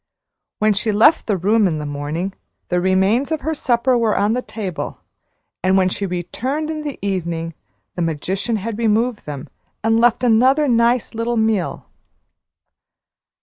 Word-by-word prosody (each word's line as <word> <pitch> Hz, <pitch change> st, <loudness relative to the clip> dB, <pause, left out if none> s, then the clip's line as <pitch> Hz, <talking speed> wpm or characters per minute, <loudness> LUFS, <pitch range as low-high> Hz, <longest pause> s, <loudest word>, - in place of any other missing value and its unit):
When 215 Hz, 0 st, +3 dB
she 210 Hz, +2 st, 0 dB
left 235 Hz, +10 st, +4 dB
the 205 Hz, -3 st, +1 dB
room 205 Hz, +3 st, +3 dB
in 160 Hz, -3 st, -1 dB
the 150 Hz, -, -4 dB
morning, 150 Hz, +6 st, -3 dB, 0.4 s
the 180 Hz, -1 st, +1 dB
remains 190 Hz, -, +2 dB
of 315 Hz, -, -1 dB
her 315 Hz, +4 st, -1 dB
supper 255 Hz, -3 st, +1 dB
were 230 Hz, -3 st, +1 dB
on 205 Hz, +2 st, +2 dB
the 250 Hz, -, -1 dB
table, 195 Hz, -9 st, -5 dB, 0.6 s
and 185 Hz, +1 st, +3 dB
when 185 Hz, -1 st, +3 dB
she 200 Hz, +2 st, -3 dB
returned 255 Hz, -, -3 dB
in 310 Hz, -1 st, -4 dB
the 290 Hz, -2 st, -5 dB
evening, 170 Hz, -4 st, -2 dB, 0.4 s
the 175 Hz, -, -4 dB
magician 185 Hz, +8 st, -1 dB
had 220 Hz, +1 st, -4 dB
removed 230 Hz, -1 st, 0 dB
them, 140 Hz, -2 st, -6 dB, 0.4 s
and 225 Hz, +1 st, +3 dB
left 240 Hz, +1 st, +3 dB
another 255 Hz, +6 st, +4 dB
nice 235 Hz, 0 st, +2 dB
little 230 Hz, +1 st, -1 dB
meal. 220 Hz, -5 st, 0 dB
215 Hz, 155 wpm, -20 LUFS, 185-240 Hz, 0.6 s, left